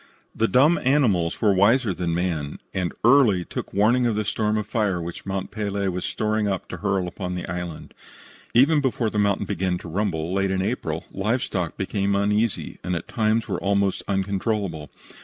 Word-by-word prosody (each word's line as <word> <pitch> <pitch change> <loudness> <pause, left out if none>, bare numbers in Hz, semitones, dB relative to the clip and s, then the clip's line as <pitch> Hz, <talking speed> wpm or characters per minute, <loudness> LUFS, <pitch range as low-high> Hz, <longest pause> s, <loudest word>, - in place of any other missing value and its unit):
The 115 - +1
dumb 150 +8 +4
animals 115 - +2
were 105 -2 +5
wiser 105 +3 +3
than 85 -1 -2
man, 85 -5 -2 0.2
and 90 -2 -1
early 115 -8 +5
took - - -6
warning 120 +5 +3
of 115 - 0
the 105 0 -1
storm 110 +1 0
of 105 - -2
fire 105 -4 0
which 85 +3 -7
Mont 95 -1 -3
Pelee 100 -2 -2
was 90 0 -3
storing 110 -1 0
up 95 -3 -2
to - - -5
hurl 95 -2 0
upon 90 0 -5
the 90 - -4
island. 90 -2 -6 0.6
Even 145 +5 +5
before 120 -4 0
the 105 - -1
mountain 100 -1 +1
began 95 -2 -1
to 90 - -10
rumble, 85 -2 -2
late 95 0 +1
in 95 0 0
April, - - -3
live 110 +6 0
stock 90 -4 -3
became 100 +1 0
uneasy, 105 +2 0
and 90 - -1
at 85 - -5
times 110 0 +1
were - - -2
almost 100 -1 +1
uncontrollable. 95 - -1
100 Hz, 185 wpm, -24 LUFS, 90-110 Hz, 0.6 s, were